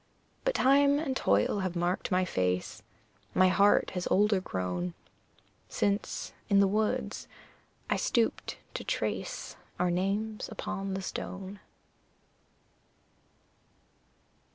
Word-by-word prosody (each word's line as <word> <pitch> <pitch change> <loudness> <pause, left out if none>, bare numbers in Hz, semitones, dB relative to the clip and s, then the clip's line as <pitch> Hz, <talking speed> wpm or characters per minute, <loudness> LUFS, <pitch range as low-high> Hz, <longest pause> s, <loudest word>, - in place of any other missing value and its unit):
But - - +1
time 280 +2 +5
and 285 -3 -1
toil 105 - +2
have 185 -2 -2
marked 175 +2 0
my 185 0 +2
face, 90 - -1 0.5
My 185 0 +6
heart 200 +2 +4
has 180 -1 -3
older 205 0 +3
grown 90 - -3 0.7
Since, 200 +1 -1 0.2
in 200 -1 +5
the 200 - +6
woods, 215 +2 -1 0.6
I - - +1
stooped 230 -3 0 0.2
to - - -4
trace - - -3 0.2
Our 180 0 +2
names 200 +4 -1
upon 195 -3 -4
the 190 - -4
stone. 190 +1 -5
195 Hz, 105 wpm, -30 LUFS, 180-215 Hz, 0.7 s, My